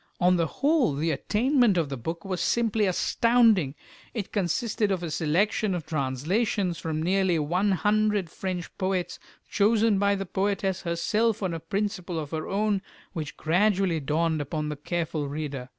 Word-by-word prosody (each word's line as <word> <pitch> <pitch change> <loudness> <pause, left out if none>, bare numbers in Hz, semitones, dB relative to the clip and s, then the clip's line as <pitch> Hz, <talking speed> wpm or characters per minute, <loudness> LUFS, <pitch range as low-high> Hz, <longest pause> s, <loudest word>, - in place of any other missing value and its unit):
On 180 0 +4
the 165 -2 +1
whole, 285 - +1
the 160 +3 0
attainment 230 - +2
of 160 -4 0
the 135 - -3
book 165 +8 -5
was 185 -2 -2
simply 225 -3 +1
astounding. 220 - +3 0.4
It 210 -4 -4
consisted 205 +2 0
of 185 -2 -1
a 165 - -3
selection 185 +6 +1
of 170 - -5
translations 165 - -1
from 160 -1 -3
nearly 190 -1 +2
one 180 +7 +1
hundred 210 0 +1
French 180 +1 -5
poets, 185 -1 -1 0.3
chosen 215 0 +3
by 200 0 +3
the 195 0 -3
poetess 195 0 -1
herself 210 +6 0
on 185 -3 -1
a 165 - -3
principle 195 0 -3
of 150 -2 -4
her 160 -1 -3
own 205 0 0 0.3
which 155 -4 -5
gradually 185 0 +2
dawned 155 +2 0
upon 150 +1 -3
the 150 - -3
careful 160 0 -3
reader. 140 -3 -5
180 Hz, 160 wpm, -26 LUFS, 160-205 Hz, 0.4 s, On